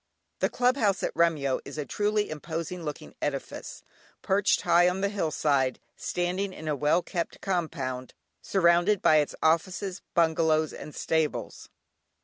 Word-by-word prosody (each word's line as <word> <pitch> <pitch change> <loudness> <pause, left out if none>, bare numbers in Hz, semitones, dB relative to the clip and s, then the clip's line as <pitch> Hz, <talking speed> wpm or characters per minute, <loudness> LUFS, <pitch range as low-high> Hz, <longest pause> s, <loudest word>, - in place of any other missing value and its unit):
The - - +2
Club 250 +2 +2
House 200 -6 +1
at - - -1
Remyo 155 -6 +2
is - - -9
a 150 - -2
truly 210 +5 0
imposing 165 +3 -5
looking 150 -3 -6
edifice, 140 -2 -4 0.4
perched 195 +1 +2
high 175 +1 +5
on 185 +2 -3
the 200 - +1
hill 195 -6 -1
side, 140 -4 +1 0.2
standing 185 +2 -2
in 160 - -8
a 150 - +1
well 150 +5 +2
kept 170 -2 -4
compound, 135 -9 -3 0.3
surrounded 175 +2 +3
by 155 - +6
its 150 -1 +1
offices, 180 +4 +1
bungalows, 160 -2 +2
and 150 - -9
stables. 160 -2 -2
170 Hz, 145 wpm, -28 LUFS, 150-190 Hz, 0.4 s, by